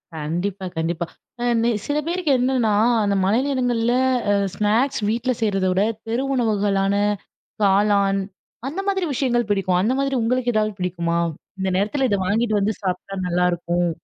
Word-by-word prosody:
கண்டிப்பா, 175 +6 -3
கண்டிப்பா. 165 +1 -1 0.4
அ - - -1 0.2
நெ 235 - +3 0.2
சில 290 +1 -1
பேருக்கு 345 -4 0
என்னன்னா, 245 -4 +2 0.3
அந்த 200 -1 +1
மழை 210 +5 +3
நேரங்கள்ல 245 -4 +1 0.4
அ - - +4 0.2
ஸ்நாக்ஸ் 220 +5 +1
வீட்ல 240 +3 0
செய்றத 195 -3 +1
விட, 190 +2 +2 0.2
தெரு 235 +4 -1
உணவுகளான 200 -4 +1 0.7
காளான் 200 0 +3 0.5
அந்த 345 +8 -3
மாதிரி 385 -2 +1
விஷயங்கள் 240 -4 0
பிடிக்கும். 185 -3 +1
அந்த 230 +6 +1
மாதிரி 275 -1 0
உங்களுக்கு 245 +1 0
எதாவது 215 -1 +1
பிடிக்குமா? 170 -2 -1 0.4
இந்த 190 0 0
நேரத்தில 255 +7 +1
இத 200 - +2
வாங்கிட்டு 220 +2 +1
வந்து 210 +2 +1
சாப்பிட்டா 185 +1 -3
நல்லாயிருக்கும். 175 0 +1
210 Hz, 145 wpm, -22 LUFS, 190-245 Hz, 0.7 s, அ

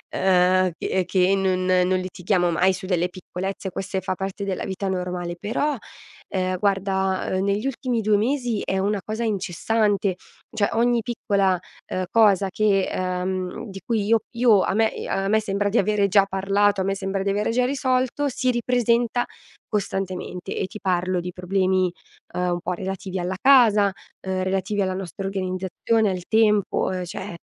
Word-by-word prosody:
uhm, 185 -1 +3
che 190 -1 0
che 190 +1 +3
non 185 -1 0
non 185 0 +3
litighiamo 180 -1 0
mai 185 +3 +3
su 190 +1 -7
delle 180 -1 +1
piccolezze, 190 +2 -5
queste 190 +1 -3
fa 185 0 -2
parte 195 +1 -4
della 190 -2 -2
vita 195 +1 -3
normale 180 -2 -3
però, 260 +10 -1 0.5
ehm, 185 -1 -1
guarda, 190 -1 0
uhm, 185 0 0
negli 200 +3 0
ultimi 255 -2 -1
2 210 0 +3
mesi 240 0 0
è 190 - -1
una 200 +1 0
cosa 220 +2 -3
incessante; 205 0 0 0.4
cioè, 205 -2 +2
ogni 235 0 +2
piccola, 200 -5 0 0.3
uhm, 185 0 -1
cosa 205 -4 +4
che, 195 -1 +2
ehm 185 +3 -3
di 195 0 -8
cui 220 -4 0
io 225 +1 +4 0.2
io 230 -5 +5
a 190 - 0
me 220 +1 +2
e - - -5
a 195 0 0
me 220 +2 +3
sembra 205 -1 -1
di 210 - +1
avere 200 0 +2
già 200 0 +5
parlato, 195 +1 +1
a - - +1
me 195 0 0
sembra 195 0 -2
di 200 - 0
avere 205 +2 0
già 250 +1 +2
risolto, 260 +1 0
si 255 0 0
ripresenta 240 0 +1 0.4
costantemente 190 -3 -3
e - - -1
ti 215 - -9
parlo 185 -1 0
di 180 +1 -5
problemi, 185 0 +1 0.4
uhm, 180 0 0
un 175 - -1
po' - - -3
relativi 190 0 -4
alla 180 +2 -2
casa, 225 -7 +6 0.3
uhm, 185 0 -1
relativi 195 +2 -1
alla 185 -1 0
nostra 190 +1 -5
organizzazione, 195 +3 0
al 180 -2 -3
tempo, 210 -2 +3
uhm, 185 -1 -2
cioè 175 +1 -6
195 Hz, 170 wpm, -23 LUFS, 185-215 Hz, 0.5 s, casa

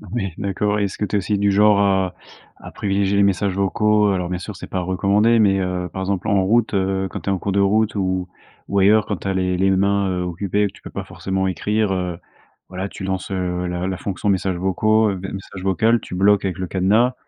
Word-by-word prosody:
Ouais, 95 -7 -2
d'accord 105 +1 -1
et - - +1
est-ce 100 - -3
que 105 - 0
tu 105 - -3
es - - +4
aussi 100 +2 -1
du 100 0 +2
genre 105 +1 +4
à 95 -2 +2 0.4
à - - -11
privilégier 100 0 0
les 100 - +5
messages 100 0 +1
vocaux? 105 +1 +2
Alors 90 -2 -2
bien 90 - -2
sûr, 100 +3 -7
c'est - - -9
pas 95 - -2
recommandé, 100 +5 +2
mais, 100 -3 +3
heu, 90 -1 -2
par 95 - -5
exemple 95 -1 -2
en 100 -1 +3
route, 115 +3 +2
heu, 95 0 0
quand - - -6
tu - - -4
es - - +2
en - - 0
cours 100 - -2
de 100 - +1
route 105 +3 +2
ou 95 -2 -1 0.4
ou 100 - 0
ailleurs, 105 +2 +4
quand 105 - -1
tu 95 - -7
as 95 - 0
les 90 -1 0
les 95 +1 +2
mains, 100 +1 +2
heu, 90 -1 -2
occupées, 100 +4 -1
tu - - -18
peux - - -9
pas - - -5
forcément 95 0 -3
écrire, 105 +3 0
heu. 90 -2 -2 0.5
Voilà 95 +1 -4
tu 100 - -9
lances, 95 0 -3
heu, 90 -1 -2
la 90 +1 -3
la 95 -1 -3
fonction 100 +2 -3
messages 95 -1 0
vocaux 110 +4 +2
des 95 +1 -6
messages 95 -1 -8
vocal, 110 +5 +2
tu - - -10
bloques 100 +2 +3
avec 95 0 -3
le 95 - -3
cadenas 105 +8 +2
95 Hz, 245 wpm, -21 LUFS, 95-105 Hz, 0.5 s, les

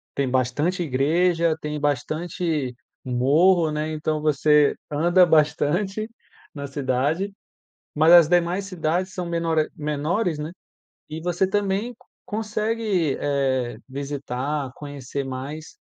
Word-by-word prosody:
tem 140 -2 0
bastante 130 +8 0
igreja, 165 +4 +2
tem 150 0 -3
bastante 150 0 -1 0.3
morro, 155 +7 +3
né. 150 +1 -2
Então 155 0 -2
você 150 0 +4 0.2
anda 175 +5 +4
bastante 175 +7 +1 0.5
na 140 0 -5
cidade, 140 +8 -1 0.6
mas 155 +3 +4
as 170 -3 +9
demais 175 +2 +2
cidades 180 0 -2
são 180 - -4
menore 165 -2 0
menores, 155 +4 -1
né. 155 +2 -4 0.6
E 155 +1 -6
você 175 +2 0
também 205 +3 -1 0.3
consegue, 215 -7 -1
eh, 130 -4 0
visitar, 140 0 -3
conhecer 140 -1 -6
mais, 135 +4 -7
155 Hz, 110 wpm, -23 LUFS, 140-175 Hz, 0.6 s, as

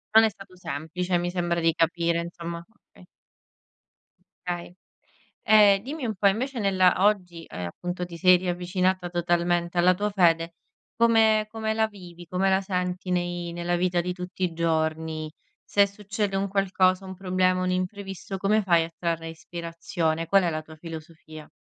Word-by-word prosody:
Non 220 - +9
è - - +2
stato 195 -3 -14
semplice, 175 +2 -3
mi 175 0 -2
sembra 175 -1 -1
di 165 0 +2
capire, 170 +1 +1
insomma. 170 0 -6 0.3
Okay. - - -18 1.4
Okay. 175 0 -4 0.7
Ehm, 205 -2 +6
dimmi 275 +2 -5
un 220 - -2
po', 200 +2 +4
invece 245 +6 -1
nella 190 -3 +4
oggi, 180 -5 +1
ehm, 90 -1 -6
appunto 180 - -5
ti 170 -1 -9
sei 185 +1 +6
riavvicinata 180 0 -1
totalmente 175 0 0
alla 180 +1 +5
tua 210 +3 -1
fede. 170 -3 +2 0.4
Come 220 -2 +4
come 220 -1 -2
la 220 0 +2
vivi, 175 -4 -12
come 185 +3 +1
la 190 0 +3
senti 180 -1 -3
nei 175 -1 -2
nella 175 +1 -1
vita 180 0 +1
di 180 +1 -2
tutti 180 +1 -8
i 175 - -1
giorni? 160 -1 -1 0.3
Se 200 0 +3
succede 200 0 -3
un 195 +1 0
qualcosa, 190 -1 +2
un 190 - -7
problema, 185 -1 +1
un 185 - 0
imprevisto, 195 +1 -4
come 210 +3 +2
fai 170 -4 +3
a 165 - -7
trarre 165 -1 -2
ispirazione? 165 0 -3
Qual 195 +3 +4
è 175 - +1
la 155 -1 -3
tua 155 0 -14
filosofia? 155 -1 -10
180 Hz, 165 wpm, -26 LUFS, 170-195 Hz, 1.4 s, Non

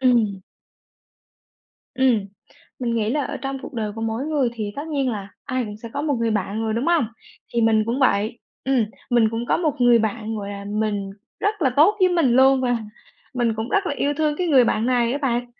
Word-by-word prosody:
Ừm. 230 -7 +2 1.6
Ừm, 245 -6 +2 0.5
mình 240 -2 -1
nghĩ 220 -1 0
là 290 +2 0
ở - - -4
trong 270 0 -4
cuộc - - -9
đời 215 -3 -2
của 225 - -7
mỗi 225 +3 -2
người 295 -5 +1
thì 210 -3 -4
tất 295 +3 -5
nhiên 275 -4 0
là 200 -3 -5 0.2
ai 255 -2 -1
cũng 210 -1 -7
sẽ 230 +2 -9
có 285 - -2
một 295 -2 +1
người 230 -1 +1
bạn 210 +1 -1
rồi, 220 - -1
đúng 235 +4 -1
hông? 335 -7 +3 0.5
Thì 235 - +2
mình 220 -1 +4
cũng 240 +4 -1
vậy 220 -2 +2 0.3
ừm, 265 -4 +2 0.3
mình 235 -2 +4
cũng 230 +1 -3
có - - +2
một 305 -5 -1
người 245 -1 +6
bạn, 220 0 -2
gọi 200 -1 -5
là, 200 0 -7
mình 205 -2 -1 0.3
rất 415 -2 0
là 265 - +3
tốt 365 +9 +5
với 370 - +6
mình 335 -8 +2
luôn, 265 +1 +5
và 245 -2 +1 0.6
mình 240 -3 +1
cũng 220 +2 -3
rất 400 +4 +1
là 285 - -1
yêu 285 - +1
thương 305 -1 +1
cái 360 - -1
người 270 -6 +5
bạn 225 0 +1
này 245 -2 +2
á 280 - -1
bạn. 245 -4 -1
240 Hz, 225 wpm, -22 LUFS, 220-275 Hz, 1.6 s, người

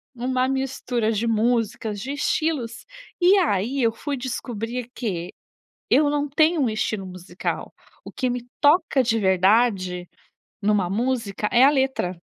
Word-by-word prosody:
um 245 +2 -4 0.2
mistura 255 -4 -1
de 230 +2 -1
músicas, 225 -2 0
de 260 +7 -5
estilos. 285 -6 -1 0.4
E 375 +3 +6
aí 255 - 0
eu 225 - +3
fui 280 +5 -4
descobrir 245 -1 -4
que 180 -7 -3 0.6
eu 290 +1 +4
não 290 0 -1
tenho 310 +2 +3
um 250 - +2
estilo 215 -2 -2
musical; 180 0 -5 0.3
o - - -8
que 255 -2 -1
me 245 0 -4 0.2
toca 290 -3 +4
de 225 -1 +1
verdade 190 -2 +2 0.5
numa 200 -3 +1
música, 220 -1 -1
é 245 +2 +5
a 275 - +8
letra. 265 -10 0
235 Hz, 140 wpm, -23 LUFS, 205-270 Hz, 0.6 s, a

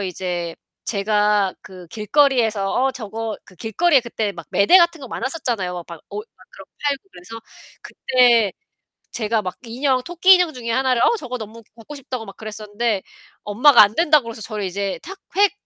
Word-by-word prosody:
거기서 200 - -2
이제 175 -2 -4 0.3
제가 210 -1 +1
그 185 -2 -12
길거리에서 220 - +1
"어, 265 +1 +1
저거" 225 -1 -5
그 185 - -18
길거리에 275 - +2
그때 225 -4 -3
막 - - -10
매대 200 - +5
같은 340 -2 +2
거 265 - -9
많았었잖아요. 240 - -3
막 170 -2 -9
옷 425 +2 -6
막 - - -19
그런 - - -13
거 - - -67
팔고 280 -2 0
그래서 225 +6 -10 0.4
그때 240 -6 +3 0.6
제가 220 -1 0
막 185 -1 -5
인형, 255 +2 0
토끼 350 +5 +5
인형 360 -3 +2
중에 235 -3 -6
하나를 255 -1 +1
"어, 470 - +3
저거 255 - -6
너무 225 +1 -9
갖고 230 +6 -11
싶다."고 255 -4 -6
막 195 - -11
그랬었는데 215 0 -3 0.4
엄마가 235 +4 +6
안 205 +1 +3
된다고 305 -3 +4
그래서 230 -1 -8
저를 210 -1 -4
이제 195 +1 -3
탁, 385 +2 -10 0.2
획 405 0 +4
230 Hz, 360 characters per minute, -21 LUFS, 205-270 Hz, 0.6 s, 엄마가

